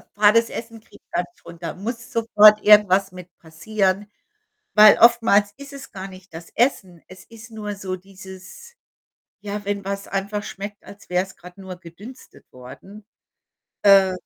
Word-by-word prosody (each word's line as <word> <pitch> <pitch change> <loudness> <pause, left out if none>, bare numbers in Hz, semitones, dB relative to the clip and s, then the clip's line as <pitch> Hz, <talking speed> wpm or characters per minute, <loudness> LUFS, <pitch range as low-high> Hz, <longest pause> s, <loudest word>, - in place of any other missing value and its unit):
Fades 215 +2 +3
Essen 230 -1 -8
kriege - - -20
ich - - -58
gar - - 0
nicht 350 - -17
runter, 170 0 -8
muss 230 +4 -7
sofort 215 -2 +5
irgendwas 200 -2 +4
mit 180 -1 -12
passieren. 190 +5 -2 0.7
Weil 215 -1 +7
oftmals 225 -3 +4
ist 280 0 -12
es 275 -3 -12
gar 195 -1 -8
nicht 185 -2 -16
das 165 +1 -11
Essen. 190 - -1
Es 185 0 -15
ist 230 0 -15
nur 210 -2 -6
so 190 -2 -6
dieses 190 - -14 0.7
ja, 205 0 -6
wenn 200 0 -3
was 195 +1 -5
einfach 200 +1 -4
schmeckt, 205 +1 -9
als 200 -2 -15
wäre 180 +1 +1
es 195 - -16
grad 180 +2 -15
nur 190 -1 -9
gedünstet 185 +9 -15
worden, 130 +12 -13 0.8
äh, 195 -2 +5
200 Hz, 160 wpm, -21 LUFS, 185-215 Hz, 0.8 s, Weil